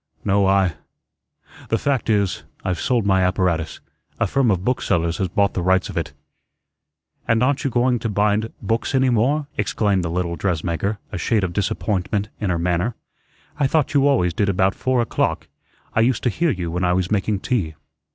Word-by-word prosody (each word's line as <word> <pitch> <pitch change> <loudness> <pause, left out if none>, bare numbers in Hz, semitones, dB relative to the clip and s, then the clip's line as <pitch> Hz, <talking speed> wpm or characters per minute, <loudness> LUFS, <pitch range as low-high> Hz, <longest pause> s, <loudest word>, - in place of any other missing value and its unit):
"No, 100 -1 +3
I 95 -3 +3 1.0
the 115 - +2
fact 135 -1 -1
is, 100 -3 +1 0.2
I've 90 -3 -1
sold 120 -5 +1
my 95 -2 +3
apparatus; 90 -3 0 0.4
a - - +3
firm 135 -3 +2
of 95 -2 0
booksellers 85 -9 0
has 95 - +1
bought 100 +2 +1
the 90 - -2
rights 95 +1 +2
of - - -7
it." - - -2 1.2
"And 115 +1 +3
aren't 140 +2 +1
you 135 - +1
going 120 0 +2
to 115 - -2
bind 105 +2 +1
books 115 +4 -1
any 130 -1 +3
more?" 135 +7 +2
exclaimed 100 -2 +1
the 85 - -2
little 85 0 -2
dressmaker, 90 +3 -1
a 95 - -4
shade 110 -1 +1
of 90 -1 -2
disappointment 105 0 -1
in 105 - -1
her 85 - +1
manner. 90 +6 0 0.6
"I 140 - +3
thought 150 0 +1
you 140 -1 +4
always 90 -12 +2
did 100 +3 0
about 95 0 +2
four 130 -1 0
o'clock. - - -1 0.5
I - - +1
used 115 +1 +2
to 125 - +2
hear 165 +9 0
you 90 - -2
when 90 +2 -2
I 90 0 +2
was 90 +1 -1
making 100 -1 0
tea." 90 -11 -1
100 Hz, 190 wpm, -21 LUFS, 90-120 Hz, 1.2 s, you